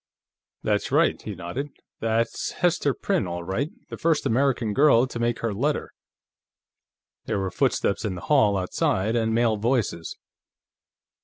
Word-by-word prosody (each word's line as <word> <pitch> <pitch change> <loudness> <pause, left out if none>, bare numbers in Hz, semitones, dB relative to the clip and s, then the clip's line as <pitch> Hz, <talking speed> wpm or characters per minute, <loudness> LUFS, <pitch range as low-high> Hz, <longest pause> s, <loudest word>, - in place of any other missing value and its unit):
"That's - - 0
right," - - +3
he 105 - -6
nodded. 95 - -5 0.3
"That's 115 +1 -1
Hester 170 -5 +1
Prynne, 190 - 0
all 85 0 -4
right; 95 - -2 0.2
the - - -6
first 165 -2 +1
American 120 -3 +1
girl 135 -2 +5
to 125 -2 -6
make 120 0 0
her 115 -2 -1
letter." 140 +9 -1 1.3
There - - -1
were 95 -1 -2
footsteps 100 +3 0
in 100 -4 -2
the 90 - -7
hall 110 -9 +3
outside, 95 +3 0
and 110 -1 +1
male 115 -1 +2
voices. 110 -7 -1
115 Hz, 145 wpm, -25 LUFS, 100-135 Hz, 1.3 s, girl